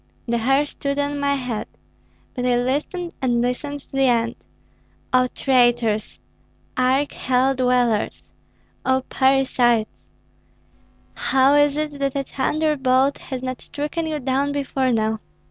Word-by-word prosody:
The 235 Hz, 0 st, 0 dB
hair 270 Hz, +5 st, +2 dB
stood 280 Hz, -1 st, -4 dB
on 285 Hz, 0 st, -1 dB
my 280 Hz, 0 st, +1 dB
head, 250 Hz, -5 st, -4 dB, 0.7 s
but 250 Hz, -, -4 dB
I 250 Hz, -1 st, +2 dB
listened 290 Hz, +8 st, -2 dB
and 245 Hz, -2 st, +1 dB
listened 275 Hz, +4 st, -2 dB
to -, -, -18 dB
the 270 Hz, -1 st, +2 dB
end. 235 Hz, -1 st, +2 dB, 0.8 s
O 255 Hz, 0 st, +4 dB
traitors! 240 Hz, -5 st, +1 dB, 0.6 s
arch 260 Hz, +3 st, +1 dB
hell 260 Hz, +1 st, +1 dB
dwellers! 250 Hz, -4 st, +1 dB, 0.6 s
O 260 Hz, 0 st, +1 dB
parricides! 260 Hz, -4 st, +3 dB, 1.3 s
How 265 Hz, +1 st, +3 dB
is 290 Hz, 0 st, +4 dB
it, 300 Hz, -2 st, -3 dB
that 275 Hz, -1 st, -1 dB
a 275 Hz, -, 0 dB
thunderbolt 275 Hz, -1 st, +1 dB
has 260 Hz, -1 st, -6 dB
not 255 Hz, -1 st, -4 dB
stricken 300 Hz, +3 st, -4 dB
you 310 Hz, -1 st, -2 dB
down 270 Hz, +2 st, 0 dB
before 270 Hz, -2 st, -1 dB
now? 220 Hz, -1 st, 0 dB
265 Hz, 130 wpm, -22 LUFS, 250-280 Hz, 1.3 s, O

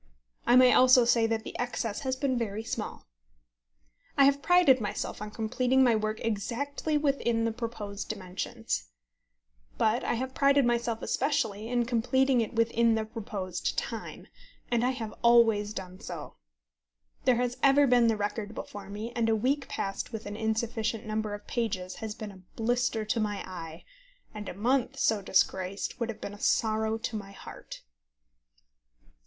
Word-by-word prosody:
I 240 Hz, -, +6 dB
may 255 Hz, 0 st, +7 dB
also 255 Hz, -1 st, +7 dB
say 235 Hz, -1 st, +4 dB
that 225 Hz, -1 st, -1 dB
the -, -, -8 dB
excess 235 Hz, -3 st, -2 dB
has 260 Hz, -2 st, -2 dB
been 260 Hz, 0 st, 0 dB
very 220 Hz, -2 st, -2 dB
small. -, -, -5 dB, 1.1 s
I 280 Hz, -, +7 dB
have 280 Hz, +1 st, +4 dB
prided 340 Hz, -8 st, +5 dB
myself 205 Hz, -, -4 dB
on 210 Hz, -, -5 dB
completing 250 Hz, +4 st, +1 dB
my 240 Hz, -3 st, +4 dB
work 215 Hz, 0 st, -1 dB
exactly 255 Hz, +8 st, -1 dB
within 270 Hz, -6 st, +1 dB
the 230 Hz, -, +1 dB
proposed 220 Hz, -3 st, -5 dB
dimensions. 185 Hz, -, -4 dB, 0.9 s
But 220 Hz, +3 st, +2 dB
I -, -, 0 dB
have 260 Hz, +2 st, -3 dB
prided 275 Hz, 0 st, +4 dB
myself 235 Hz, -1 st, 0 dB
especially 225 Hz, -7 st, 0 dB
in 240 Hz, 0 st, +1 dB
completing 255 Hz, +2 st, +2 dB
it 225 Hz, -, -4 dB
within 230 Hz, 0 st, +3 dB
the 220 Hz, 0 st, -1 dB
proposed 200 Hz, -5 st, -4 dB
time, -, -, -4 dB, 0.5 s
and 235 Hz, -1 st, +2 dB
I 250 Hz, -, +3 dB
have 230 Hz, -5 st, -4 dB
always 225 Hz, -3 st, +5 dB
done 185 Hz, -2 st, -7 dB
so. -, -, -7 dB, 0.9 s
There 255 Hz, -, +5 dB
has 245 Hz, +1 st, -1 dB
ever 280 Hz, +1 st, +6 dB
been 245 Hz, -2 st, +4 dB
the 225 Hz, -1 st, +2 dB
record 210 Hz, +1 st, -3 dB
before 200 Hz, -1 st, -8 dB
me, 215 Hz, +3 st, -5 dB
and 230 Hz, -2 st, +1 dB
a 225 Hz, -, +3 dB
week 265 Hz, +5 st, 0 dB
passed 195 Hz, +4 st, -3 dB
with 220 Hz, -2 st, -6 dB
an 205 Hz, -, -5 dB
insufficient 220 Hz, 0 st, -1 dB
number 215 Hz, -1 st, -2 dB
of 205 Hz, -, -12 dB
pages 190 Hz, -6 st, -3 dB
has 220 Hz, -2 st, -5 dB
been 215 Hz, -2 st, -7 dB
a 190 Hz, -1 st, -14 dB
blister 235 Hz, -1 st, 0 dB
to 215 Hz, +2 st, 0 dB
my 205 Hz, -2 st, -2 dB
eye, 165 Hz, -3 st, -8 dB, 0.5 s
and 210 Hz, -2 st, -6 dB
a -, -, -7 dB
month 245 Hz, +5 st, +1 dB
so 215 Hz, -2 st, +2 dB
disgraced 190 Hz, +2 st, 0 dB
would 235 Hz, -1 st, -1 dB
have 230 Hz, -, -5 dB
been 200 Hz, -, -5 dB
a 205 Hz, -, -11 dB
sorrow 220 Hz, 0 st, +1 dB
to 225 Hz, 0 st, -4 dB
my 200 Hz, -2 st, -6 dB
heart. -, -, -10 dB
225 Hz, 165 wpm, -29 LUFS, 210-245 Hz, 1.1 s, may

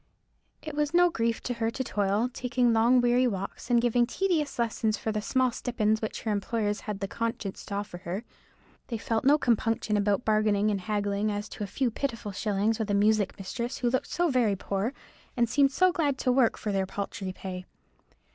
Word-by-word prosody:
It 310 Hz, -, -6 dB
was 295 Hz, +2 st, -1 dB
no 355 Hz, 0 st, +5 dB
grief 230 Hz, -6 st, -1 dB
to 250 Hz, -, -2 dB
her 225 Hz, -1 st, -1 dB
to 260 Hz, +3 st, -3 dB
toil, 205 Hz, 0 st, 0 dB
taking 245 Hz, -2 st, +1 dB
long 235 Hz, +3 st, +5 dB
weary 245 Hz, +1 st, +3 dB
walks 195 Hz, +2 st, -5 dB
and 240 Hz, -1 st, +5 dB
giving 240 Hz, 0 st, +2 dB
tedious 320 Hz, -1 st, 0 dB
lessons 225 Hz, -2 st, 0 dB
for 220 Hz, -, -2 dB
the 215 Hz, 0 st, -2 dB
small 255 Hz, +3 st, +1 dB
stipends 220 Hz, -3 st, 0 dB
which 220 Hz, -, -4 dB
her 220 Hz, -, -1 dB
employers 210 Hz, 0 st, -1 dB
had 205 Hz, -1 st, -4 dB
the 195 Hz, -, -1 dB
conscience 225 Hz, -2 st, -4 dB
to 200 Hz, -, -5 dB
offer 200 Hz, -3 st, -5 dB
her; 185 Hz, +5 st, -4 dB, 0.6 s
they 230 Hz, -, -3 dB
felt 220 Hz, +1 st, -1 dB
no 290 Hz, +2 st, +6 dB
compunction 225 Hz, -4 st, +1 dB
about 205 Hz, +2 st, +1 dB
bargaining 215 Hz, -1 st, +2 dB
and 200 Hz, -2 st, -2 dB
haggling 205 Hz, +1 st, -1 dB
as 205 Hz, +1 st, -3 dB
to 210 Hz, -, -6 dB
a -, -, -3 dB
few 250 Hz, +4 st, -1 dB
pitiful 230 Hz, -4 st, -3 dB
shillings 210 Hz, +2 st, 0 dB
with 220 Hz, -1 st, -2 dB
a 205 Hz, -, +2 dB
music 210 Hz, -1 st, +2 dB
mistress 235 Hz, +6 st, -4 dB
who 245 Hz, -1 st, 0 dB
looked 260 Hz, -, 0 dB
so 350 Hz, 0 st, +1 dB
very 235 Hz, -6 st, +2 dB
poor, 195 Hz, +4 st, -2 dB, 0.5 s
and 240 Hz, -1 st, +3 dB
seemed 275 Hz, +4 st, +3 dB
so 370 Hz, +6 st, +4 dB
glad 290 Hz, -6 st, 0 dB
to 255 Hz, -, +1 dB
work 250 Hz, -2 st, +3 dB
for 210 Hz, -, -3 dB
their 195 Hz, -1 st, 0 dB
paltry 195 Hz, -1 st, -4 dB
pay. 185 Hz, -1 st, -7 dB
225 Hz, 205 wpm, -28 LUFS, 205-245 Hz, 0.6 s, no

